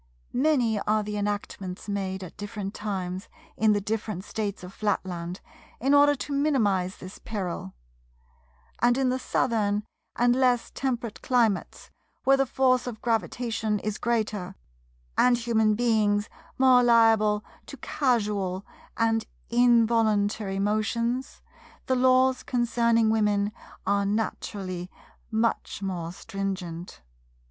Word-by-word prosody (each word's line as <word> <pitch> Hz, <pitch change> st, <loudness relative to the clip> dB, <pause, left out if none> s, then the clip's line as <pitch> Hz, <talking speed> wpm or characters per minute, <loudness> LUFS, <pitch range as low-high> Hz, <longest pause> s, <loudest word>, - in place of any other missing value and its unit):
Many 250 Hz, -6 st, +2 dB
are 215 Hz, +1 st, +1 dB
the 210 Hz, 0 st, -4 dB
enactments 205 Hz, -2 st, -4 dB
made 190 Hz, -2 st, -3 dB
at 180 Hz, -, -10 dB
different 205 Hz, -1 st, -5 dB
times 190 Hz, -3 st, -4 dB, 0.3 s
in 215 Hz, -1 st, +3 dB
the 205 Hz, -, +1 dB
different 210 Hz, -2 st, -3 dB
States 205 Hz, -3 st, -4 dB
of 180 Hz, +1 st, -9 dB
Flatland, 185 Hz, -4 st, -3 dB, 0.4 s
in 270 Hz, +4 st, +2 dB
order 290 Hz, 0 st, +6 dB
to 285 Hz, +1 st, -5 dB
minimize 210 Hz, -11 st, +1 dB
this 185 Hz, +1 st, -10 dB
peril; 180 Hz, -, -5 dB, 1.1 s
and 240 Hz, +1 st, +4 dB
in 265 Hz, -1 st, +2 dB
the 255 Hz, +1 st, 0 dB
Southern 215 Hz, -5 st, 0 dB, 0.3 s
and 245 Hz, 0 st, +3 dB
less 250 Hz, -2 st, +2 dB
temperate 240 Hz, -4 st, -3 dB
climates, 235 Hz, -6 st, 0 dB, 0.3 s
where 270 Hz, +1 st, +5 dB
the 270 Hz, 0 st, +1 dB
force 255 Hz, -1 st, +2 dB
of 225 Hz, -3 st, -5 dB
gravitation 225 Hz, -2 st, -1 dB
is 210 Hz, +1 st, -4 dB
greater, 215 Hz, -5 st, -1 dB, 0.6 s
and 250 Hz, -1 st, +5 dB
human 220 Hz, -2 st, +2 dB
beings 210 Hz, -3 st, +2 dB, 0.3 s
more 260 Hz, -1 st, +6 dB
liable 225 Hz, -3 st, +4 dB, 0.2 s
to 280 Hz, -, -9 dB
casual 210 Hz, -10 st, 0 dB, 0.3 s
and 225 Hz, -1 st, +1 dB, 0.2 s
involuntary 225 Hz, -4 st, +3 dB
motions, 230 Hz, +5 st, -1 dB, 0.4 s
the 260 Hz, -, +1 dB
Laws 255 Hz, 0 st, +4 dB
concerning 235 Hz, -2 st, +2 dB
Women 210 Hz, -2 st, +2 dB, 0.3 s
are 200 Hz, 0 st, +1 dB
naturally 195 Hz, -4 st, -3 dB, 0.4 s
much 220 Hz, -2 st, -1 dB
more 175 Hz, -4 st, -3 dB
stringent. 180 Hz, -, -5 dB
215 Hz, 120 wpm, -26 LUFS, 200-240 Hz, 1.1 s, order